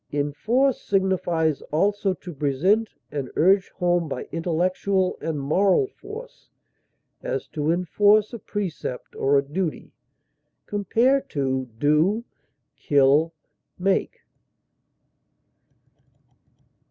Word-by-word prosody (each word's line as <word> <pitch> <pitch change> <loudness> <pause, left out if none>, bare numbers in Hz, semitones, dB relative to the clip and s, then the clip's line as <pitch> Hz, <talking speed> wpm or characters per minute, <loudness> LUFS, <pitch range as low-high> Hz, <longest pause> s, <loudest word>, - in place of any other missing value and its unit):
Enforce 195 - +1
signifies 175 -6 0
also 200 +5 +1
to 180 -2 -9
present 160 +11 +1 0.2
and 140 -3 -4
urge 190 +3 +4
home 175 -3 0
by - - -4
intellectual 180 +3 0
and 160 -3 -2
moral 190 - +3
force; 455 +4 -11 0.7
as, - - -3
to 150 -1 -2
enforce 205 +5 +3
a 235 - -5
precept 185 - -5
or 140 +1 +2
a 140 - +2
duty. 160 +3 -4 0.7
Compare 230 +7 +2
DO; 145 - 0 0.5
KILL; 145 +3 +3 0.5
MAKE. 190 +1 0
175 Hz, 90 wpm, -24 LUFS, 150-205 Hz, 0.7 s, urge